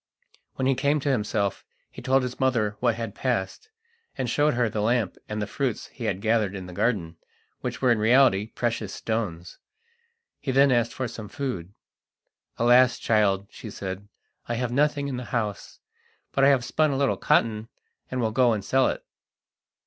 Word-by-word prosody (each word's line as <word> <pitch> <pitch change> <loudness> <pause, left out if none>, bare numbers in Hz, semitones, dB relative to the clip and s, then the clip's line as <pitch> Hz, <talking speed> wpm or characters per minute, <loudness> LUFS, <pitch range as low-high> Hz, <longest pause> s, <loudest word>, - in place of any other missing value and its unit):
When 130 - -1
he 135 - +4
came 145 +3 +1
to 140 - +1
himself 105 -4 -1 0.3
he - - -10
told 130 0 +2
his 125 0 -5
mother 115 -6 +1
what 120 -2 +2
had 115 -3 -5
passed, 125 - -2 0.5
and 130 -2 -1
showed 145 +3 +2
her 120 -1 +2
the 105 -1 -2
lamp 115 -3 +1
and 105 0 -3
the 105 - -1
fruits 125 +2 -3
he 120 - -7
had 100 -3 -1
gathered 110 -3 +1
in 95 -2 -6
the 90 - -9
garden, 85 -6 -1 0.4
which - - -5
were 125 - +5
in 115 - +2
reality 110 -2 +4
precious 115 -3 -2
stones. 95 -6 -4 0.8
He 135 - -2
then 135 +1 +5
asked 120 -1 +2
for 130 - -2
some 110 -2 -8
food. 105 -10 -5 0.8
"Alas! 120 +1 +5
child," 100 -3 +2
she 110 - -9
said, 95 0 -6 0.4
"I 120 - -1
have 120 0 -2
nothing 145 +2 +1
in 135 -3 -3
the 125 - -5
house, 105 -6 -3 0.5
but 135 - +1
I - - +7
have 135 -3 +3
spun 155 +5 +2
a 135 - -1
little 140 -1 +2
cotton 110 -1 +1 0.4
and 130 -1 -2
will 110 -1 0
go 120 +1 +3
and 105 -2 -3
sell 130 0 +3
it." - - -3
120 Hz, 185 wpm, -25 LUFS, 105-130 Hz, 0.8 s, I